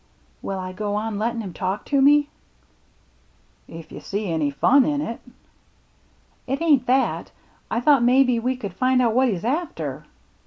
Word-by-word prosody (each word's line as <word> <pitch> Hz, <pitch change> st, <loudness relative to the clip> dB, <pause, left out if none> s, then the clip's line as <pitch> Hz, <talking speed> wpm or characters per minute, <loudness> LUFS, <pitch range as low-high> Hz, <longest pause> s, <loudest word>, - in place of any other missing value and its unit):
" -, -, -37 dB
Will 195 Hz, -, -4 dB
I 185 Hz, 0 st, -5 dB
go 205 Hz, +1 st, -3 dB
on 210 Hz, -1 st, -3 dB
lettin' 230 Hz, +1 st, -1 dB
him 190 Hz, -5 st, -7 dB
talk 190 Hz, +3 st, -3 dB
to 280 Hz, -2 st, +1 dB
me? 290 Hz, +1 st, +5 dB, 0.4 s
" -, -, -38 dB
" -, -, -38 dB
If 165 Hz, -1 st, -11 dB
you -, -, -8 dB
see 200 Hz, -2 st, -4 dB
any 155 Hz, -3 st, 0 dB
fun 255 Hz, -, +4 dB
in 290 Hz, +2 st, -1 dB
it." 235 Hz, -5 st, -4 dB, 0.7 s
" -, -, -38 dB
It 270 Hz, +2 st, -2 dB
ain't 295 Hz, -6 st, +2 dB
that 265 Hz, +2 st, +1 dB, 0.2 s
— -, -, -36 dB
I 230 Hz, -, -1 dB
thought 280 Hz, -1 st, +4 dB
maybe 250 Hz, 0 st, +3 dB
we 255 Hz, +3 st, -1 dB
could 205 Hz, -7 st, -7 dB
find 255 Hz, +6 st, +1 dB
out 235 Hz, -3 st, +2 dB
what 260 Hz, +2 st, +3 dB
he's 200 Hz, -4 st, -2 dB
after." 315 Hz, +8 st, -3 dB
235 Hz, 195 wpm, -23 LUFS, 205-270 Hz, 0.7 s, me